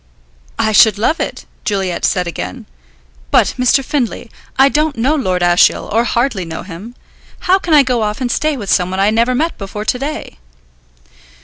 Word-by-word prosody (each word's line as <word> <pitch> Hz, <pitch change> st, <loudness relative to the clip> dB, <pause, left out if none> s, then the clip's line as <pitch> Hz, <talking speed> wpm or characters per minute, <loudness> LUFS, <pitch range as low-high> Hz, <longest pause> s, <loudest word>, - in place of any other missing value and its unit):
"I 220 Hz, -, +1 dB
should 215 Hz, -1 st, +5 dB
love 240 Hz, +10 st, 0 dB
it," -, -, -4 dB, 0.2 s
Juliet 195 Hz, -4 st, -1 dB
said 180 Hz, -1 st, +1 dB
again. 90 Hz, -, -6 dB, 0.6 s
"But, -, -, +3 dB
Mr. 255 Hz, +2 st, +2 dB
Findlay, 245 Hz, -4 st, -3 dB, 0.3 s
I 270 Hz, +1 st, +6 dB
don't 300 Hz, 0 st, 0 dB
know 255 Hz, +6 st, +1 dB
Lord 185 Hz, -12 st, 0 dB
Ashiel, 175 Hz, 0 st, +3 dB
or 230 Hz, +2 st, +2 dB
hardly 235 Hz, -5 st, 0 dB
know 165 Hz, -1 st, -7 dB
him. 195 Hz, +7 st, -10 dB, 0.5 s
How 375 Hz, +2 st, +3 dB
can 335 Hz, -4 st, +1 dB
I 290 Hz, -, +7 dB
go 250 Hz, -3 st, 0 dB
off 210 Hz, 0 st, -2 dB
and 250 Hz, -2 st, -2 dB
stay 305 Hz, -2 st, 0 dB
with 205 Hz, -5 st, -4 dB
someone 185 Hz, 0 st, 0 dB
I 200 Hz, +2 st, +3 dB
never 235 Hz, +3 st, +1 dB
met 320 Hz, +6 st, -1 dB
before 210 Hz, +1 st, -6 dB
to 250 Hz, -, 0 dB
day?" 280 Hz, -, -6 dB
230 Hz, 180 wpm, -16 LUFS, 190-270 Hz, 0.6 s, I